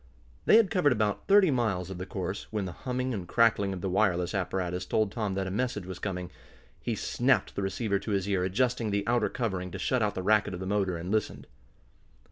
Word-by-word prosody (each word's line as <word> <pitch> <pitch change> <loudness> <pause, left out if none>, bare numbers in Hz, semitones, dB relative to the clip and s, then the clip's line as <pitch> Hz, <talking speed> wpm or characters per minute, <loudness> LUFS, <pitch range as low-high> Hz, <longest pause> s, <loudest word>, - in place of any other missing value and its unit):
They - - +7
had 225 -5 +4
covered 160 -8 +3
about 105 -3 -1
thirty 195 -4 +6
miles 100 -8 0
of 90 - -6
the 95 - -5
course, 95 +1 -4
when 105 -3 -2
the 90 - -4
humming 125 +5 -3
and 95 -5 -5
crackling 115 -2 +3
of 95 -2 -5
the 95 - -2
wireless 90 -2 +1
apparatus 90 -2 -2
told 105 +2 0
Tom 105 -4 -2
that 95 0 -1
a 95 - -4
message 105 -2 -2
was 95 -1 -7
coming. 90 -3 -4 0.5
He - - -2
snapped - - +1
the - - -2
receiver 100 +1 -1
to 100 - -7
his 100 -2 0
ear, 95 -3 +1
adjusting 115 +4 0
the 100 0 -1
outer 120 +1 +2
covering 95 -7 -2
to 95 - -6
shut 125 +6 0
out 105 -1 0
the 95 - -3
racket 105 -1 +2
of - - -7
the 95 - -5
motor, 95 -2 0
and 85 +3 -5
listened. 110 -1 -1
100 Hz, 225 wpm, -29 LUFS, 95-115 Hz, 0.5 s, They